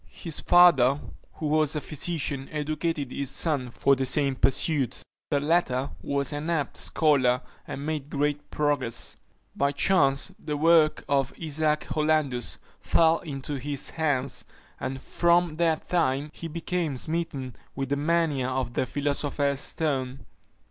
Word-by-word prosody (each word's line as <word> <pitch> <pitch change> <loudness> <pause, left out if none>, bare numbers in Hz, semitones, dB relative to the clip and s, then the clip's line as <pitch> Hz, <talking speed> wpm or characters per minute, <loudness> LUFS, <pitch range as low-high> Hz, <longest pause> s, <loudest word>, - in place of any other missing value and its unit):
His 165 -3 -4
father, 150 -7 +5 0.3
who 155 - -6
was 155 0 +2
a - - 0
physician, 145 -3 -3
educated 155 -2 -2
his 140 -2 -2
son 140 -5 +1
for 140 +3 +2
the 135 0 0
same 140 +1 +2
pursuit. 135 +2 +1 0.3
The 145 - +2
latter 145 -4 +1
was 140 0 0
an 145 +3 -3
apt 160 -5 -1
scholar, 130 -5 +3 0.3
and 140 - -5
made 150 -2 -3
great 145 0 -1
progress. 145 -6 -1 0.4
By 140 0 +1
chance 140 -4 +2
the 150 -1 -3
work 160 0 +4
of 135 -1 +1
Isaac 155 -1 0
Hollandus 150 -6 0 0.2
fell 165 0 +3
into 140 -2 -5
his 140 0 -2
hands, 140 -5 -1 0.4
and 130 +1 -4
from 170 +3 +2
that 165 -2 +1
time 145 -4 0
he 165 - -7
became 165 -2 -2
smitten 150 -5 -3 0.2
with 135 -1 -3
the 140 - +1
mania 150 -3 +1
of 130 -2 -2
the 130 - 0
philosopher's 145 -1 -1
stone. 135 -5 -2
145 Hz, 140 wpm, -26 LUFS, 135-160 Hz, 0.4 s, father